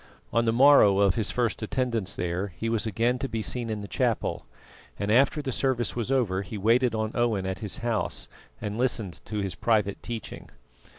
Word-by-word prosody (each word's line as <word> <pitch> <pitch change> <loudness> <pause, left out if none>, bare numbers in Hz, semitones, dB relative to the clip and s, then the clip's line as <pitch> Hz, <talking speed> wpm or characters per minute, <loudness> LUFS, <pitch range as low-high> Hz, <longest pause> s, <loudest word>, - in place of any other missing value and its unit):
On 115 0 +3
the 115 - +3
morrow 125 -5 +6
of 100 -2 +4
his 110 -1 0
first 120 -3 0
attendance 115 -4 -2
there 90 +3 -2
he 115 - -2
was 115 -1 0
again 115 +4 +1
to 135 - -3
be 110 -1 -3
seen 120 0 -2
in 105 -1 -3
the 100 - -7
chapel, - - -1 0.5
and 100 +1 -1
after 140 +5 +3
the 135 - -2
service 130 -2 0
was 120 +1 -2
over 110 -8 +1
he 105 +2 -7
waited 115 +3 +3
on 110 0 -1
Owen 115 -5 0
at 95 0 -3
his 105 -4 -4
house 115 -2 -1 0.3
and 105 +2 -4
listened 110 - -1
to 105 -1 -3
his 95 -2 -3
private 105 -4 0
teaching. 115 -2 -7
110 Hz, 195 wpm, -27 LUFS, 100-120 Hz, 0.5 s, morrow